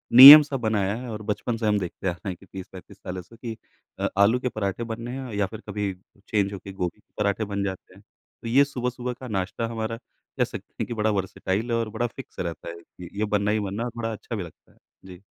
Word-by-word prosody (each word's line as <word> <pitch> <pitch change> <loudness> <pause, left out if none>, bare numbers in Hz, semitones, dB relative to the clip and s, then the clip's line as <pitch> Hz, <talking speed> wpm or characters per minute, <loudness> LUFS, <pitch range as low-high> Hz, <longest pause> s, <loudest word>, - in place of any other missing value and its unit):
नियम 140 +4 +14
सा 140 -2 -3
बनाया 105 -3 0
है 125 - -6
और 110 0 -5
बचपन 115 +2 -2
से 110 -1 -1
हम 105 -1 +3
देखते 95 0 -5
आ - - +3
रहे 85 +3 -6
हैं 90 - -4
कि 95 - -16
30-35 95 +1 -10
सालों 90 -1 -6
से 115 +6 -17
कि 115 -2 -6 0.4
अ, - - +1
आलू 110 +5 +5
के 125 - -1
पराठे 100 0 -2
बनने 115 +2 -6
हैं 130 -4 -6
या 100 -1 +2
फिर 110 +3 -9
कभी 105 -1 -2 0.4
चेंज 100 -2 +1
होके 100 0 -8
गोभी 90 -3 -3
के - - -34
पराठे 105 +1 0
बन 100 -1 -2
जाते 95 -2 -5
हैं। - - -17
तो - - -15
ये 135 +5 +6
सुबह 125 -3 -2
सुबह 125 0 -4
का 130 - -7
नाश्ता 100 +2 -2
हमारा 115 0 -3 0.4
कह - - +4
सकते - - -7
हैं - - -1
कि - - -4
बड़ा 110 -1 +1
वर्सेटाइल 100 +3 -2
है 115 - +2
और 115 +1 -1
फ़िक्स 130 +2 -11
रहता 85 -1 -4
है। 85 - -7 0.4
ये 110 - +2
बनना 100 +1 +2
ही 110 - +2
बनना 100 +2 -3
और 120 - -4
थोड़ा 115 -1 -2
अच्छा 115 +2 -6
भी 100 - -3
लगता 85 - -14
है। - - -27 0.3
जी। 90 0 -12
105 Hz, 245 wpm, -25 LUFS, 95-115 Hz, 0.4 s, नियम